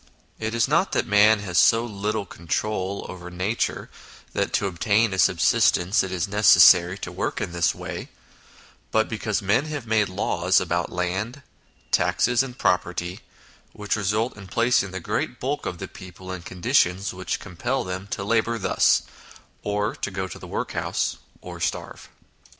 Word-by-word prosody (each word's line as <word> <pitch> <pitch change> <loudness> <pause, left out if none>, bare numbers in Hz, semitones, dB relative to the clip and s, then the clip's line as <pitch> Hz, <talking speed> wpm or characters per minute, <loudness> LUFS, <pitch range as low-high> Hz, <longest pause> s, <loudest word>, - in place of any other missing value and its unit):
It 110 +1 -3
is 115 - +2
not 165 +7 +1
that - - +1
man 105 0 +5
has 90 -4 +1
so 115 +1 +5
little 105 -1 -3
control 95 +4 -3
over 90 -1 -8
nature 95 +6 -2 0.5
that - - -1
to - - +1
obtain 100 +4 +1
a 95 - -3
subsistence 95 +1 +3
it 95 - -4
is 90 -1 -1
necessary 95 -3 +6
to - - -6
work - - -3
in - - -3
this 85 0 +1
way, - - -7 0.8
but 110 0 +2
because 110 -1 -2
men 110 +9 +2
have 145 -5 -5
made 110 -3 +2
laws 95 -1 +1
about 85 -1 -2
land, 95 +10 -3 0.5
taxes, 120 0 +2
and 130 -2 -6
pro 90 - +3
perty, 90 +1 -6 0.5
which 105 -1 -2
result 105 +3 -1
in 100 -2 -11
placing 115 -2 +2
the 95 0 -5
great - - -3
bulk 140 +3 -2
of 90 - -4
the 95 - -6
people 95 0 -11
in 90 -1 -5
conditions 95 0 +1
which 95 0 -3
compel 120 +10 -3
them 95 +1 -5
to 100 - -4
labour 115 +2 +1
thus, - - +3 0.6
or 105 0 -1
go 95 -1 -4
to - - -9
the - - -10
workhouse, - - -2 0.2
or - - -9
starve. - - -4
100 Hz, 160 wpm, -24 LUFS, 90-110 Hz, 0.8 s, necessary